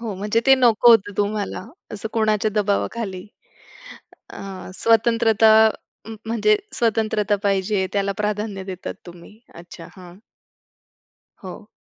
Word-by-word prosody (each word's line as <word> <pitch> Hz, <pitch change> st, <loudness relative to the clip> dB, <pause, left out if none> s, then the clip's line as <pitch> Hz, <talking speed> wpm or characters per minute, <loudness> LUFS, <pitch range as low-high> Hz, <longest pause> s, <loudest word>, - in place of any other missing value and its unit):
हो 225 Hz, -4 st, -5 dB
म्हणजे 210 Hz, +3 st, -1 dB
ते 270 Hz, -, +7 dB
नको 240 Hz, -2 st, +4 dB
होतं 205 Hz, -3 st, +4 dB
तुम्हाला 205 Hz, 0 st, -3 dB, 0.3 s
असं 215 Hz, +1 st, -6 dB
कोणाच्या 215 Hz, -1 st, 0 dB
दबावाखाली 200 Hz, -1 st, -2 dB, 1.0 s
अ, 190 Hz, -1 st, -9 dB
स्वतंत्रता 225 Hz, 0 st, +3 dB, 0.5 s
अ, -, -, -13 dB, 0.2 s
म्हणजे 230 Hz, -, +2 dB, 0.2 s
स्वतंत्रता 220 Hz, -2 st, 0 dB
पाहिजे 195 Hz, 0 st, 0 dB
त्याला 200 Hz, -1 st, -1 dB
प्राधान्य 210 Hz, -2 st, -3 dB
देतात 185 Hz, -1 st, -7 dB
तुम्ही? 175 Hz, +5 st, -14 dB, 0.2 s
अच्छा 170 Hz, 0 st, -12 dB
हां. 180 Hz, -2 st, -13 dB, 1.3 s
हो. 190 Hz, +3 st, -10 dB
210 Hz, 110 wpm, -21 LUFS, 195-225 Hz, 1.3 s, ते